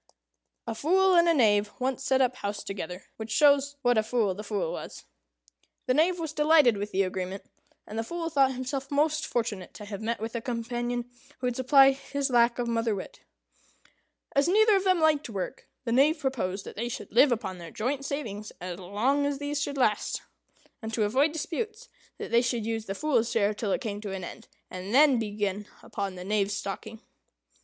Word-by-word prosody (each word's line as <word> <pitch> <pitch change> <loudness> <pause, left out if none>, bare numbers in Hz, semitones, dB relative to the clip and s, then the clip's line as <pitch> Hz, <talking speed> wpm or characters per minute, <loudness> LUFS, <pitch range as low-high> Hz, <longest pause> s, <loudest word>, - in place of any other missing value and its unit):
A 230 - -3
Fool 370 +10 +3
and 340 -1 +5
a - - +5
Knave 210 -5 +3
once 260 0 -2
set 265 0 +2
up 255 -1 +1
house 205 -4 -4
together; 180 -2 -6
which 220 0 -6
shows 285 +3 +4
what 245 -2 +4
a - - +4
fool 220 -3 0
the 205 +3 -7
Fool 205 -6 -2
was. - - -8 0.8
The 255 - +2
Knave 335 +6 +3
was 320 -3 -4
delighted 300 -6 +5
with 205 +1 -4
the 195 +1 +2
agreement; 185 +1 -4 0.4
and 215 +2 -5
the - - 0
Fool 335 +7 -4
thought 270 -3 +3
himself 270 +1 -4
most 305 +2 +1
fortunate 225 -6 -3
to 210 - -9
have 205 0 -6
met 230 +2 -2
with 225 +1 -5
a 235 - -3
companion 240 0 -3 0.3
who 255 - -5
would 245 -1 0
supply 270 +2 +6
his 275 0 -3
lack 235 -1 +4
of 245 -1 -1
mother 230 -2 0
wit. 190 - -8 1.2
As 280 +2 +4
neither 430 +3 +5
of 385 0 +1
them 370 -2 +4
liked 310 -4 +2
work, 200 +4 -5 0.2
the 230 - -1
Knave 285 +7 +4
proposed 225 -10 -2
that - - -9
they 235 +3 -3
should 245 - -7
live 280 - +6
upon 190 -6 -2
their 170 -1 -8
joint 265 - -2
savings 220 -8 -4
as 180 0 -6
long 240 +10 0
as 285 -1 -2
these 290 +1 -3
should 280 0 -3
last; 215 -5 +1 0.6
and, 220 -1 -5
to 220 - +1
avoid 265 +9 +2
disputes, 430 +9 -4 0.3
that - - -7
they 235 0 +5
should 240 -2 -1
use 225 -1 -2
the 195 - -3
Fool's 240 -4 +1
share 215 -3 +2
till 210 -1 -3
it - - 0
came 210 -4 -4
to 205 -2 -5
an 190 -1 -5
end, - - -9 0.2
and 185 +5 -5
then 280 -3 +6
begin 205 -2 -2 0.2
upon 195 -2 -4
the 180 0 -8
Knave's 205 0 0
stocking. 205 +2 -6
240 Hz, 200 wpm, -28 LUFS, 205-280 Hz, 1.2 s, supply